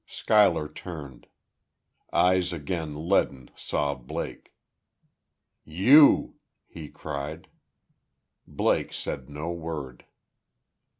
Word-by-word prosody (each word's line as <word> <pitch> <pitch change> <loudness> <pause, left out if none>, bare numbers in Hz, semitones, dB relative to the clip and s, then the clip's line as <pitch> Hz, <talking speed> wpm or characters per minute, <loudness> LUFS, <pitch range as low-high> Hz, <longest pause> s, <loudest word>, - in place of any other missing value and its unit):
Schuyler 100 -8 +3
turned. 75 -5 -10 0.8
Eyes 90 0 +3
again 80 -1 -5
leaden 70 -9 0
saw 70 -1 -2
Blake. 65 -3 -7 1.1
"You!" 125 - +5 0.3
he 80 -3 -10
cried. 75 +1 -6 1.0
Blake - - 0
said 70 -2 -6
no 75 +4 -5
word. 80 -7 -6
80 Hz, 75 wpm, -26 LUFS, 70-90 Hz, 1.1 s, You